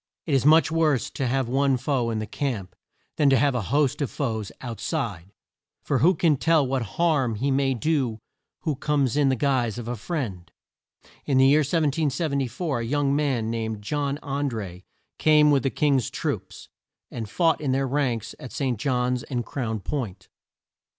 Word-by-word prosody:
It 155 Hz, -, -2 dB
is 135 Hz, +1 st, +3 dB
much 160 Hz, +1 st, +5 dB
worse 155 Hz, -6 st, +1 dB
to 135 Hz, -, -2 dB
have 130 Hz, 0 st, 0 dB
one 135 Hz, +1 st, +2 dB
foe 125 Hz, -3 st, 0 dB
in 115 Hz, -, -2 dB
the 110 Hz, -, -2 dB
camp 105 Hz, -8 st, -4 dB, 0.4 s
than 145 Hz, -2 st, +4 dB
to 135 Hz, -, +5 dB
have 140 Hz, +3 st, +2 dB
a 125 Hz, -, -1 dB
host 145 Hz, +1 st, +1 dB
of 140 Hz, -, 0 dB
foes 110 Hz, -7 st, -3 dB
out 120 Hz, -3 st, -6 dB
side, 95 Hz, -4 st, -3 dB, 0.5 s
for 135 Hz, -, 0 dB
who 180 Hz, +7 st, +4 dB
can 155 Hz, -2 st, +2 dB
tell 160 Hz, 0 st, +3 dB
what 130 Hz, 0 st, -1 dB, 0.2 s
harm 150 Hz, -9 st, +2 dB
he 135 Hz, +6 st, -1 dB
may 135 Hz, -1 st, +1 dB
do 135 Hz, -4 st, 0 dB, 0.4 s
who 155 Hz, -4 st, -1 dB
comes 140 Hz, -2 st, 0 dB
in 145 Hz, -2 st, +3 dB
the 130 Hz, -, +2 dB
guise 125 Hz, -4 st, 0 dB
of 120 Hz, -2 st, -6 dB
a 120 Hz, -, -2 dB
friend? 110 Hz, -, -5 dB, 0.8 s
In 135 Hz, -3 st, +2 dB
the 130 Hz, -, +6 dB
year 140 Hz, +3 st, +6 dB
1774 145 Hz, -2 st, 0 dB
a -, -, -3 dB
young 140 Hz, +3 st, +1 dB
man, 130 Hz, -7 st, 0 dB
named 110 Hz, -2 st, -3 dB
John 140 Hz, +4 st, -1 dB
An 140 Hz, 0 st, -1 dB
dré, 95 Hz, -6 st, -7 dB, 0.3 s
came 150 Hz, -1 st, +5 dB
with 140 Hz, -2 st, +3 dB
the 135 Hz, -, 0 dB
King's 135 Hz, -5 st, +1 dB
troops, -, -, -4 dB, 0.4 s
and 110 Hz, -3 st, -5 dB
fought 165 Hz, +6 st, +2 dB
in 140 Hz, -3 st, 0 dB
their 135 Hz, +1 st, +1 dB
ranks 125 Hz, -5 st, -1 dB
at 125 Hz, -, -9 dB
St. 130 Hz, -6 st, -2 dB
John's 125 Hz, -1 st, 0 dB
and 120 Hz, -3 st, -4 dB
Crown 110 Hz, -6 st, -3 dB
Point. 100 Hz, -6 st, -5 dB
135 Hz, 185 wpm, -25 LUFS, 115-145 Hz, 0.8 s, the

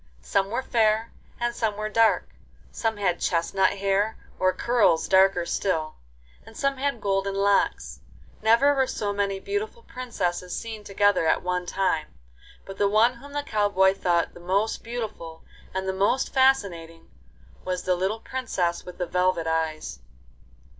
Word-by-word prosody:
Some 195 Hz, -, 0 dB
were 240 Hz, +4 st, -2 dB
fair 220 Hz, -1 st, +1 dB, 0.3 s
and 240 Hz, 0 st, -1 dB
some 220 Hz, -3 st, -1 dB
were 215 Hz, 0 st, -2 dB
dark; 225 Hz, +1 st, +2 dB, 0.4 s
some 225 Hz, -2 st, -2 dB
had 185 Hz, -4 st, 0 dB
chestnut 190 Hz, +3 st, +1 dB
hair, 200 Hz, +2 st, 0 dB, 0.2 s
or 185 Hz, 0 st, +3 dB
curls 210 Hz, -4 st, +2 dB
darker 190 Hz, -2 st, +4 dB
still, 160 Hz, -4 st, -1 dB, 0.5 s
and -, -, -14 dB
some 275 Hz, -1 st, 0 dB
had 275 Hz, -2 st, -1 dB
golden 195 Hz, -1 st, -1 dB
locks. 200 Hz, 0 st, +1 dB, 0.4 s
Never 235 Hz, +7 st, +5 dB
were 265 Hz, -2 st, +1 dB
so 205 Hz, -4 st, -2 dB
many 200 Hz, -1 st, -1 dB
beautiful 420 Hz, -, -4 dB
princesses 185 Hz, -, -3 dB
seen 225 Hz, -2 st, -6 dB
together 200 Hz, -4 st, +2 dB
at -, -, +2 dB
one 180 Hz, 0 st, -2 dB
time, 175 Hz, -5 st, -1 dB, 0.5 s
but 195 Hz, 0 st, -10 dB
the 200 Hz, -, +3 dB
one 225 Hz, +5 st, +3 dB
whom 285 Hz, +1 st, -13 dB
the 290 Hz, 0 st, -2 dB
cow 210 Hz, -5 st, 0 dB
boy 190 Hz, -1 st, +4 dB
thought 175 Hz, -3 st, 0 dB
the -, -, -13 dB
most 195 Hz, +5 st, 0 dB
beautiful 220 Hz, -9 st, -6 dB, 0.3 s
and 190 Hz, 0 st, -3 dB
the 190 Hz, -, 0 dB
most 200 Hz, +7 st, +1 dB
fascinating 200 Hz, -12 st, +1 dB, 0.5 s
was 180 Hz, -1 st, -3 dB
the 185 Hz, -, +1 dB
little 195 Hz, +5 st, -2 dB
Princess 190 Hz, -10 st, -2 dB
with 180 Hz, -, -10 dB
the 180 Hz, -, -2 dB
velvet 180 Hz, -1 st, +1 dB
eyes. 160 Hz, -, -2 dB
200 Hz, 155 wpm, -25 LUFS, 180-225 Hz, 0.5 s, Never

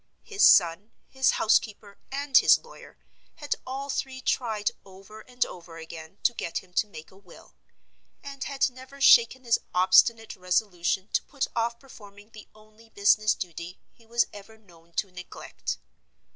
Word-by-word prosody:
His 405 Hz, -1 st, -1 dB
son, 180 Hz, +4 st, +5 dB, 0.2 s
his 265 Hz, -1 st, +1 dB
housekeeper, 215 Hz, -2 st, 0 dB
and 280 Hz, 0 st, -4 dB
his -, -, +7 dB
lawyer, 475 Hz, -, -16 dB, 0.4 s
had 290 Hz, -3 st, -3 dB
all 270 Hz, +2 st, -5 dB
three 265 Hz, -1 st, -4 dB
tried 220 Hz, -5 st, -1 dB
over 195 Hz, +3 st, -14 dB
and 250 Hz, +2 st, -2 dB
over 170 Hz, -2 st, -11 dB
again 160 Hz, +2 st, -10 dB
to 240 Hz, -, +3 dB
get 170 Hz, -, -4 dB
him 180 Hz, -1 st, -24 dB
to 210 Hz, -, +1 dB
make 160 Hz, -6 st, -12 dB
a -, -, -19 dB
will; 190 Hz, -3 st, -18 dB, 0.7 s
and 275 Hz, -1 st, -7 dB
had 275 Hz, -2 st, 0 dB
never 260 Hz, +2 st, -14 dB
shaken 260 Hz, -1 st, +5 dB
his 235 Hz, -2 st, +2 dB, 0.2 s
obstinate 220 Hz, +5 st, +4 dB
resolution 185 Hz, +1 st, -1 dB
to -, -, 0 dB
put 280 Hz, -3 st, -3 dB
off 235 Hz, 0 st, -1 dB
performing 205 Hz, -5 st, -16 dB
the 215 Hz, -1 st, -13 dB
only 215 Hz, +1 st, -21 dB
business 215 Hz, +1 st, +3 dB
duty 175 Hz, 0 st, -8 dB
he 230 Hz, -, -25 dB
was 235 Hz, +1 st, +2 dB
ever 210 Hz, +2 st, -13 dB
known 170 Hz, -5 st, -22 dB
to 195 Hz, +1 st, -2 dB
neglect. 180 Hz, 0 st, -7 dB
215 Hz, 160 wpm, -26 LUFS, 185-250 Hz, 0.7 s, his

